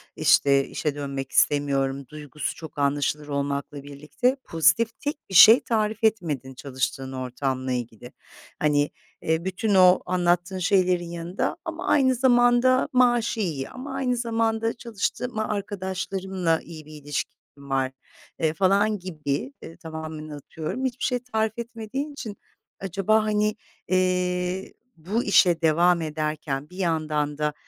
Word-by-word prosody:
işte, 140 -1 +4
işe 150 -2 -3
dönmek 140 -2 -5
istemiyorum." 140 -2 +1
duygusu 150 +1 -6
çok 160 -2 -11
anlaşılır 145 +1 0
olmakla 140 0 -3
birlikte 150 - -1
pozitif 165 +8 +2
tek 290 +1 -3
şey 220 +6 +9
tarif 215 -1 -1
etmedin 155 - 0
çalıştığın 130 0 -4
ortamla 130 0 -3
ilgili. 120 -1 -5 0.5
Hani, 145 -1 +2 0.3
eee, 160 +2 -1
bütün 195 +2 0
o 185 -1 +7
anlattığın 180 +1 0
şeylerin 180 -2 +2
yanında, 170 +2 -3
"Ama 335 +3 -5
aynı 260 -3 +4
zamanda 245 0 +4
maaşı 240 -2 +3
iyi, 155 -10 -2
ama 265 +2 -8
aynı 255 -2 0
zamanda 225 -1 0
çalıştığım 235 0 -3
a 220 - -1
arkadaşlarımla 190 -3 -2
iyi 160 -2 -11
bir 155 - -14
ilişkim 145 0 -4 0.2
var." 135 -2 -2 0.5
eee, 160 -1 +1
falan 200 +4 +2
gibi 150 -6 -4
eee, 165 0 -11
tamamen 160 -2 -7
atıyorum, 155 - -5
hiçbir 255 -1 -3
şey 250 -1 +1
tarif 220 -3 -1
etmediğin 235 +5 -5
için, 220 -7 -7 0.4
acaba, 195 +3 +1
hani, 210 0 +1 0.3
eee, 180 0 0 0.2
"Bu 200 +9 -2
işe 175 -4 +4
devam 170 +2 +3
ederken 150 -2 -3
bir 180 - -13
yandan 155 -4 -1
da, 150 0 -1
175 Hz, 130 wpm, -25 LUFS, 145-220 Hz, 0.5 s, şey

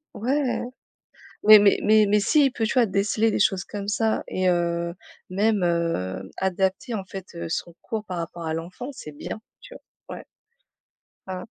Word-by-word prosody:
Ouais, 265 +7 0
mais- 245 - -1 1.0
mais 205 -1 +4
mais 215 0 +5
mais 210 +1 +3
s'il 275 +5 +3
peut, 235 - -5
tu 220 - -1
vois? 250 -3 +4
Déceler 205 +2 +1
des - - -1
choses 195 -3 +2
comme 200 -1 -6
ça 220 +1 +1
et 185 0 0
heu, 170 -1 0 0.3
même, 200 0 +1
heu, 165 - -1
adapter, 190 +7 -1
en 195 -3 -3
fait, 190 -1 -8
heu, 170 - -5
son 170 +1 -4
cours 220 -1 -4
par 180 -3 -5
rapport 170 0 -6
à 160 - -1
l'enfant, 180 - -6
c'est 155 - -9
bien, 175 +8 -7 0.2
tu - - -13 0.3
vois? - - -6
Ouais. - - -12 1.0
Mmh. 185 +3 -5
195 Hz, 175 wpm, -24 LUFS, 170-220 Hz, 1.0 s, mais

